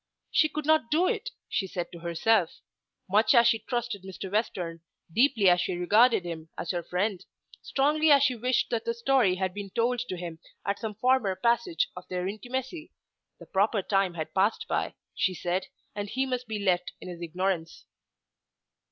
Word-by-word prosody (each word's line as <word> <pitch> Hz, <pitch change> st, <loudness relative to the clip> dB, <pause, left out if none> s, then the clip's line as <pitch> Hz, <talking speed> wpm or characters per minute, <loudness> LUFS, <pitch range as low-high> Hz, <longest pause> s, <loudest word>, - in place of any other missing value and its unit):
She 310 Hz, -, +4 dB
could 305 Hz, -1 st, -4 dB
not 310 Hz, -6 st, +3 dB
do 330 Hz, +4 st, +3 dB
it, 475 Hz, +1 st, -1 dB, 0.2 s
she 190 Hz, -, -1 dB
said 175 Hz, -2 st, -4 dB
to 170 Hz, -, -10 dB
herself. 170 Hz, +3 st, +1 dB, 0.5 s
Much 210 Hz, +7 st, +4 dB
as 235 Hz, 0 st, +7 dB
she 230 Hz, -1 st, +4 dB
trusted 240 Hz, -3 st, -3 dB
Mr. 190 Hz, 0 st, -7 dB
Western, 180 Hz, -6 st, -2 dB, 0.3 s
deeply 235 Hz, -, +4 dB
as 175 Hz, 0 st, +5 dB
she 180 Hz, -, -1 dB
regarded 210 Hz, +3 st, +4 dB
him 160 Hz, -2 st, -6 dB
as 170 Hz, -, -2 dB
her 175 Hz, -2 st, -2 dB
friend, 185 Hz, +2 st, -2 dB, 0.4 s
strongly 300 Hz, +3 st, +2 dB
as 280 Hz, -2 st, +7 dB
she 265 Hz, -3 st, +3 dB
wished 250 Hz, +2 st, 0 dB
that 230 Hz, -2 st, 0 dB
the 230 Hz, -, -2 dB
story 235 Hz, -5 st, +3 dB
had 185 Hz, 0 st, -2 dB
been 205 Hz, 0 st, -6 dB
told 235 Hz, +4 st, 0 dB
to 235 Hz, -7 st, -4 dB
him 170 Hz, -2 st, -7 dB, 0.3 s
at 200 Hz, 0 st, -1 dB
some 220 Hz, -2 st, -4 dB
former 240 Hz, -4 st, +2 dB
passage 235 Hz, -6 st, +1 dB
of 180 Hz, -, -9 dB
their 180 Hz, 0 st, -2 dB
intimacy, 260 Hz, -, -5 dB, 0.5 s
the -, -, -13 dB
proper 200 Hz, +1 st, +1 dB
time 195 Hz, -3 st, +1 dB
had 155 Hz, -1 st, -5 dB
passed 195 Hz, +3 st, +1 dB
by, -, -, -1 dB, 0.2 s
she 185 Hz, -2 st, 0 dB
said, 180 Hz, +2 st, -2 dB, 0.3 s
and 205 Hz, 0 st, -4 dB
he 260 Hz, +5 st, 0 dB
must 250 Hz, -1 st, -3 dB
be 220 Hz, -1 st, -3 dB
left 180 Hz, -3 st, 0 dB
in -, -, -10 dB
his 175 Hz, -1 st, -8 dB
ignorance. 170 Hz, -1 st, -2 dB
205 Hz, 185 wpm, -28 LUFS, 180-245 Hz, 0.5 s, as